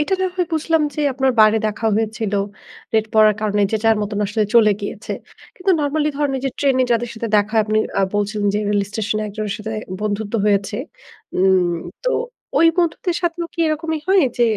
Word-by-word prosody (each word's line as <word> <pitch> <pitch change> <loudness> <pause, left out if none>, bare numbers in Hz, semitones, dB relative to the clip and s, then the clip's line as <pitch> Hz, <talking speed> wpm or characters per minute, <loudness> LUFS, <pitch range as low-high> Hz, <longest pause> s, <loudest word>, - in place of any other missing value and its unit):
এটা 340 +6 +1
না 375 - +2
হয় 360 -1 +1
বুঝলাম 320 0 +1
যে - - -3
আপনার 265 0 +1
বাইরে 215 +1 +6
দেখা 220 +1 -2
হয়েছিল, 220 -1 -2 0.6
রেট 220 0 +3
পড়ার 215 -1 +6
কারণে 205 -1 +1
যে - - +3
যার 225 -1 +4
মতন 205 0 -3
আসলে 210 +2 0
চলে 220 -3 +6
গিয়েছে। 205 +2 -5 0.4
কিন্তু 380 +1 0
নরমালি 295 +1 0
ধরেন 290 -2 0
ওই - - -4
যে - - -1
ট্রেনে 265 -2 +3
যাদের 235 +1 0
সাথে 225 0 -4
দেখা 205 +2 +1
আপনি 215 0 +1 0.2
আ - - +3
বলছিলেন 205 0 0
যে - - +2
রেল 205 -1 +2
স্টেশনে 215 0 -2
একজনের 210 0 -4
সাথে 220 +1 -5 0.3
বন্ধুত্ব 210 +1 -3
হয়েছে। 200 0 +1 0.6
উম 185 -1 +3 0.4
তো - - +2 0.5
ওই 330 - +6
বন্ধুদের 345 +1 0
সাথেও 340 0 -1
কি - - -27
এরকমই 315 +1 -1
হয় 385 -3 +5 0.2
যে, 240 - +4
220 Hz, 190 wpm, -20 LUFS, 210-300 Hz, 0.6 s, বাইরে